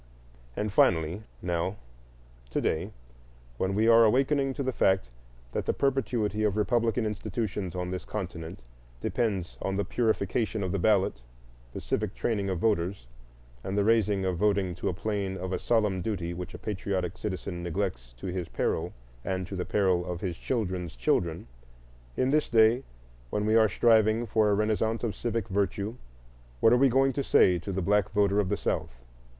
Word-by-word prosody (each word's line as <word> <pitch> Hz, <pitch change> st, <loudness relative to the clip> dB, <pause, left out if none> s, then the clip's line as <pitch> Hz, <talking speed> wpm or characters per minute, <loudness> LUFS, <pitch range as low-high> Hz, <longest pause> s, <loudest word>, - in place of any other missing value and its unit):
And 105 Hz, -1 st, -2 dB
finally, 85 Hz, +1 st, +3 dB, 0.2 s
now, 90 Hz, +2 st, -1 dB, 0.7 s
to -, -, -1 dB
day, 80 Hz, -, -1 dB, 0.7 s
when 95 Hz, +1 st, 0 dB
we 110 Hz, +2 st, +3 dB
are 115 Hz, 0 st, +7 dB
awakening 135 Hz, +4 st, +2 dB
to 140 Hz, -, -2 dB
the 130 Hz, -, 0 dB
fact 95 Hz, -, +1 dB, 0.4 s
that -, -, -3 dB
the -, -, +1 dB
perpetuity 120 Hz, -6 st, 0 dB
of 105 Hz, -1 st, +1 dB
republican 115 Hz, +1 st, +1 dB
institutions 105 Hz, -3 st, -3 dB
on 90 Hz, 0 st, -3 dB
this 95 Hz, -, -4 dB
continent 85 Hz, -6 st, -6 dB, 0.4 s
depends 100 Hz, -, -2 dB
on 95 Hz, -, -1 dB
the 100 Hz, -, 0 dB
purification 110 Hz, -1 st, 0 dB
of 90 Hz, -, -2 dB
the 100 Hz, -, -1 dB
ballot, 95 Hz, -, +2 dB, 0.5 s
the -, -, -5 dB
civic -, -, -2 dB
training 100 Hz, -4 st, -1 dB
of 95 Hz, -, -1 dB
voters, 95 Hz, -, 0 dB, 0.6 s
and 95 Hz, +2 st, -3 dB
the 100 Hz, -, +3 dB
raising 105 Hz, -3 st, +2 dB
of 90 Hz, -2 st, 0 dB
voting 100 Hz, -2 st, +1 dB
to 90 Hz, -, -4 dB
the -, -, 0 dB
plane 100 Hz, 0 st, -2 dB
of 95 Hz, 0 st, -4 dB
a -, -, -1 dB
solemn 105 Hz, -5 st, +1 dB
duty 90 Hz, -4 st, -3 dB
which 90 Hz, 0 st, -7 dB
a -, -, -6 dB
patriotic 95 Hz, -3 st, -3 dB
citizen 95 Hz, -3 st, -4 dB
neglects 85 Hz, -9 st, -3 dB
to -, -, -11 dB
his 90 Hz, -2 st, -3 dB
peril -, -, -1 dB, 0.3 s
and 95 Hz, -1 st, -2 dB
to 95 Hz, -, -7 dB
the 90 Hz, -, -2 dB
peril 95 Hz, -4 st, +2 dB
of 85 Hz, -, -4 dB
his 90 Hz, -4 st, -2 dB
children's 95 Hz, -, -3 dB
children,—in -, -, -3 dB
this 150 Hz, +1 st, +2 dB
day, 115 Hz, +3 st, +4 dB, 0.5 s
when 105 Hz, +10 st, -1 dB
we 110 Hz, +1 st, +3 dB
are 110 Hz, -1 st, +5 dB
striving 110 Hz, +3 st, +3 dB
for 110 Hz, -1 st, +2 dB
a 100 Hz, -, +3 dB
renaissance 110 Hz, +2 st, 0 dB
of 115 Hz, -3 st, -1 dB
civic 115 Hz, -3 st, -2 dB
virtue, 100 Hz, +2 st, -1 dB, 0.7 s
what 115 Hz, -, +5 dB
are -, -, +6 dB
we 135 Hz, +1 st, +5 dB
going 135 Hz, +2 st, +3 dB
to 140 Hz, -, -1 dB
say 90 Hz, -8 st, +4 dB
to 100 Hz, -, -5 dB
the 95 Hz, -1 st, -2 dB
black 105 Hz, +1 st, +2 dB
voter 100 Hz, 0 st, +2 dB
of 100 Hz, -3 st, +1 dB
the -, -, 0 dB
South? -, -, -3 dB
100 Hz, 175 wpm, -28 LUFS, 90-110 Hz, 0.7 s, are